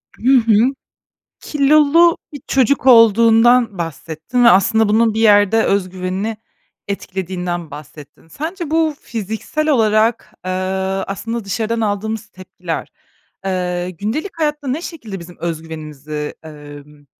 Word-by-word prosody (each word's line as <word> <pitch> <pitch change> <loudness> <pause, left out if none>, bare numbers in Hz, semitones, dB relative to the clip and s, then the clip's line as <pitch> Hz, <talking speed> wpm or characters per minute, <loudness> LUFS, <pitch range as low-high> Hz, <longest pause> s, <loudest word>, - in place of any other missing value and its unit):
Hı 260 +3 +3
hı. 230 +2 +3 0.7
Kilolu 305 +3 +4 0.2
bir 290 - -8
çocuk 265 0 +1
olduğundan 230 -1 +5
bahsettin 165 - -3
ve 235 - +8
aslında 220 +2 +4
bunun 220 +1 +2
bir 225 - -1
yerde 210 0 +4
öz 195 -2 0
güvenini 190 +4 -4 0.5
etkilediğinden 180 -4 -4
bahsettin. 150 +1 -13
Sence 320 - -6
bu 320 -1 +1
fiziksel 225 +8 -4
olarak, 220 -3 +1
eee, 185 - -3 0.6
aslında 225 +3 -5
dışarıdan 225 +3 -2
aldığımız 220 +1 -2
tepkiler, 185 -4 -7 0.6
eee, 180 -1 -2
gündelik 220 - -4
hayatta 295 -3 -2
ne 285 +6 -1
şekilde 225 - -7
bizim 175 +1 -12
öz 165 -2 -4
güvenimizi, 150 -2 -7
emm, 145 -1 -13
215 Hz, 120 wpm, -18 LUFS, 180-245 Hz, 0.7 s, ve